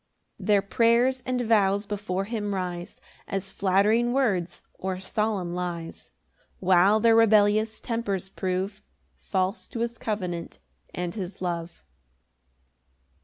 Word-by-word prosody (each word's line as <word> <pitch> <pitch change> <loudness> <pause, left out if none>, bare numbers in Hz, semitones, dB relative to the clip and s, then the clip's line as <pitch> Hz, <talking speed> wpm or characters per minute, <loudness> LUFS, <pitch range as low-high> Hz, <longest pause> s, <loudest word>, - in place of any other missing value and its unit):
5 - - -8
Their 205 -2 +5
prayers 235 +5 +3
and 255 -1 0
vows 205 -3 +2
before 200 -2 -2
him 205 -2 -3
rise 180 -2 -5 0.3
As 195 0 -3
flattering 210 +6 +2
words 195 -10 0
or 190 -1 -4
solemn 195 -2 -1
lies, 175 -2 -5 0.5
While 190 +3 +5
their 225 0 +5
rebellious 215 0 +4
tempers 205 -5 -2
prove 190 +2 -3 0.3
False 190 +1 -2
to 230 - -5
his 235 0 -3
covenant 180 -6 -4 0.4
and 175 -1 -3
his 190 -3 -6
love. 170 -2 -4
200 Hz, 120 wpm, -26 LUFS, 185-220 Hz, 0.5 s, Their